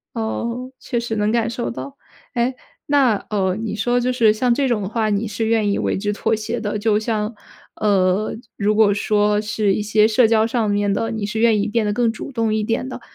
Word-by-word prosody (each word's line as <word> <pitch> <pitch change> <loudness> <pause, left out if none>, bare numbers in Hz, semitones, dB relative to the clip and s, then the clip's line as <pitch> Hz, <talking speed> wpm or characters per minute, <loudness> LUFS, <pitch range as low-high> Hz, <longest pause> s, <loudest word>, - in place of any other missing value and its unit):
哦， 235 +3 -3
确 240 - -2
实 235 -1 -3
能 210 0 +1
感 230 -1 +1
受 235 0 -3
到。 280 +3 -8 0.4
哎， 245 +2 0 0.3
那 270 -7 +3
哦， 190 -3 0
你 225 -1 -3
说 245 +3 +1
就 250 +1 0
是 230 -4 +4
像 235 +3 +1
这 275 +2 +1
种 235 -4 0
的 190 - -4
话 220 -1 0
你 210 +2 0
是 215 +2 -3
愿 220 -2 +2
意 - - 0
为 - - 0
之 205 +2 -1
妥 215 - 0
协 220 +2 -3
的。 210 -1 -2
就 210 0 +2
像， 215 0 -2 0.4
呃， 200 -1 +1 0.2
如 210 +1 +1
果 210 -2 +5
说 210 0 +1
是 210 -1 0
一 210 - -1
些 210 +1 +3
社 225 +1 +4
交 220 -1 +3
上 225 -2 0
面 205 0 +1
的， 225 +3 -1
你 220 -2 -3
是 210 +2 -3
愿 225 -2 +4
意 - - -1
变 220 0 0
得 205 - 0
更 230 +1 +1
主 235 - -8
动 225 -4 0
一 215 0 0
点 225 +4 -1
的。 255 - -7
220 Hz, 245 characters per minute, -20 LUFS, 210-235 Hz, 0.4 s, 果